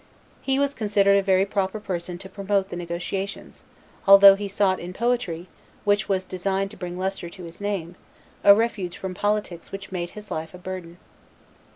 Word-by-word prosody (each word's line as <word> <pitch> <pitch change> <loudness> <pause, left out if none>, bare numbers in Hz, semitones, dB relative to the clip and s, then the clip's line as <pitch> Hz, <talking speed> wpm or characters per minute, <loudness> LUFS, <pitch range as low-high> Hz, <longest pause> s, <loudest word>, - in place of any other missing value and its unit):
He 270 0 0
was 280 0 +1
considered 205 -4 +3
a 200 - +4
very 190 0 +3
proper 200 +1 -1
person 175 -3 -4
to 190 - -10
promote 200 0 -1
the - - -5
negotiations, 175 +3 -5 0.4
although 195 0 +10
he 200 +1 -4
sought 195 -2 +1
in 180 +1 -7
poetry, 215 -7 -1 0.4
which 205 0 +1
was 190 -1 +1
destined 190 +1 -2
to - - -12
bring 180 -1 -6
lustre 190 -2 -3
to 185 +1 -11
his 170 +3 -11
name, 190 -4 -3 0.5
a 200 0 +9
refuge 200 -5 -1
from 190 -2 -5
politics 205 -3 -2
which 195 0 -7
made 175 -2 -3
his 210 0 -10
life 160 +2 -4
a - - -8
burden. 180 -2 -7
195 Hz, 180 wpm, -24 LUFS, 180-205 Hz, 0.5 s, although